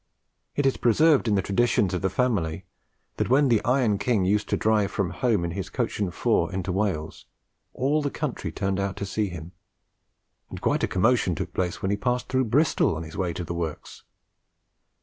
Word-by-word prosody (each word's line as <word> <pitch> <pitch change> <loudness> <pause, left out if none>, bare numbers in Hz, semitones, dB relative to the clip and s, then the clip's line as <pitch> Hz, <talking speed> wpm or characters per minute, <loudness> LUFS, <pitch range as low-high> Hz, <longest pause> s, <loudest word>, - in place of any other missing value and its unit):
It 145 - 0
is 135 - +2
preserved 145 +3 +4
in 105 - +3
the 95 - +1
traditions 100 -2 +1
of 90 - -1
the 95 - +1
family 95 -7 -1 0.5
that - - -1
when 135 +2 +4
the 115 -3 +3
'Iron 125 -5 +2
King' 105 -3 +1
used 105 +3 +1
to - - +1
drive 105 -2 +2
from 100 -3 -2
home 110 -9 0
in 85 - -3
his 95 +2 -5
coach - - -2
and 100 -4 0
four - - +1
into 95 0 -3
Wales, 95 -5 -2 0.5
all 145 +4 +1
the 145 - -1
country 130 - -4
turned 95 +1 -2
out 100 -1 -2
to 100 - -4
see 105 +1 -1
him, 85 -1 -8 1.0
and - - -7
quite - - 0
a - - +3
commotion 95 -2 +2
took - - -5
place 90 -1 -2
when 95 - 0
he 100 - 0
passed 125 +4 -1
through 130 0 +1
Bristol 140 - +2
on 80 - -5
his 80 -1 -10
way 90 -2 -1
to 90 +1 -5
the 85 - -5
works. 85 -3 -5
100 Hz, 205 wpm, -25 LUFS, 90-125 Hz, 1.0 s, preserved